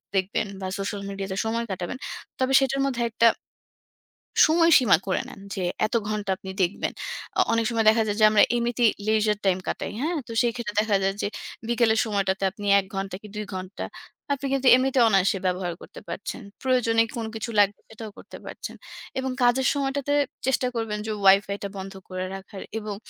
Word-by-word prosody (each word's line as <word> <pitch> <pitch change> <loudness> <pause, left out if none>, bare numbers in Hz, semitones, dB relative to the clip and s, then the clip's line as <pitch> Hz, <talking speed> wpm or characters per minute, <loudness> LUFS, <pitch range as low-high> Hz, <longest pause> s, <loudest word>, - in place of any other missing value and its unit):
দেখবেন 190 +2 0
বা 190 - -3
social 200 +1 -3
media-তে 195 -1 -4
সময় 230 +1 -1
কাটাবেন। 185 +5 -4 0.4
তবে 260 +1 +1
সেটার 270 0 0
মধ্যে 255 -3 -1
একটা 230 +1 +4 1.2
সময়সীমা 315 - +5
করে 190 - +1
নেন - - -11 0.2
যে 190 - -2 0.2
এত 215 - -2
ঘণ্টা 210 -2 -3
আপনি 190 - -9
দেখবেন। 175 +2 -1 0.5
অ - - +7
অনেক 230 0 +2
সময় 225 -2 0
দেখা 220 +1 +4
যায় 205 0 -1
যে 215 - +7
আমরা 215 - +6
এমনিতেই 240 0 +2 0.2
leisure 215 -1 +2
time 185 -1 +2
কাটাই, - - -3
হ্যাঁ? 330 +4 0
তো - - -8
সেক্ষেত্রে 235 -3 -2
দেখা 215 -1 +1
যায় 195 0 +1
যে - - 0 0.4
বিকেলের 230 -2 +3
সময়টাতে 195 -2 -1
আপনি 205 +2 -9
১ 195 - -4
ঘণ্টা 195 -1 -3
কি 215 - -11
২ 210 0 -3
ঘণ্টা 185 +1 -5 0.5
আপনি 280 0 -3
কিন্তু 270 -1 +1
এমনিতেও 260 -1 +3
অনায়াসে 195 -1 +3
ব্যবহার 180 -1 -1
করতে - - -11
পারছেন। - - -5 0.2
প্রয়োজনীয় 230 -3 +3
কোন 230 - -2
কিছু 220 +2 -4
লাগবে 205 0 +3
সেটাও 220 -1 -9
করতে - - -11
পারছেন - - -7 0.4
এবং 260 0 -2
কাজের 245 +1 +3
সময়টাতে 280 0 -1 0.3
চেষ্টা 260 -1 +1
করবেন 225 -2 -2
যে - - -1
Wi-Fi-টা 200 +1 +4
বন্ধ 195 +1 -6 0.2
করে 185 0 -3
রাখার 195 +1 -9 0.2
এবং 210 -1 -5
220 Hz, 175 wpm, -25 LUFS, 195-245 Hz, 1.2 s, অ